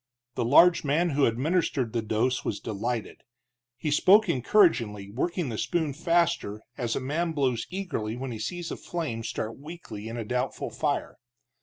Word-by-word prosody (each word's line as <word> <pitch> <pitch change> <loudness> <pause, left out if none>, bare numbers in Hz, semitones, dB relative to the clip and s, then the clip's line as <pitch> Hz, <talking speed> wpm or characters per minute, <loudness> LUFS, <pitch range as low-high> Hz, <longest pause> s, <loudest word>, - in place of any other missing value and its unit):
The - - -1
large 170 +8 +6
man 160 +4 +1
who 140 0 +3
administered 130 -1 0
the 115 - 0
dose 110 +4 0
was 100 - -2
delighted. 115 +2 -4 0.6
He 150 +3 -2
spoke 200 +8 +6
encouragingly, 120 - +2
working 170 - -1
the 110 - -4
spoon 160 -5 0
faster, 165 - 0
as 120 -4 -2
a - - 0
man 160 +6 -1
blows 130 -6 0
eagerly 155 - -3
when 130 0 -4
he 110 - -6
sees 175 +8 -4
a - - -4
flame 150 -10 -4
start 110 +1 -4
weakly 150 -8 -8
in 115 +1 -5
a 115 - -4
doubtful 125 +3 -2
fire. - - -2
130 Hz, 165 wpm, -27 LUFS, 115-170 Hz, 0.6 s, large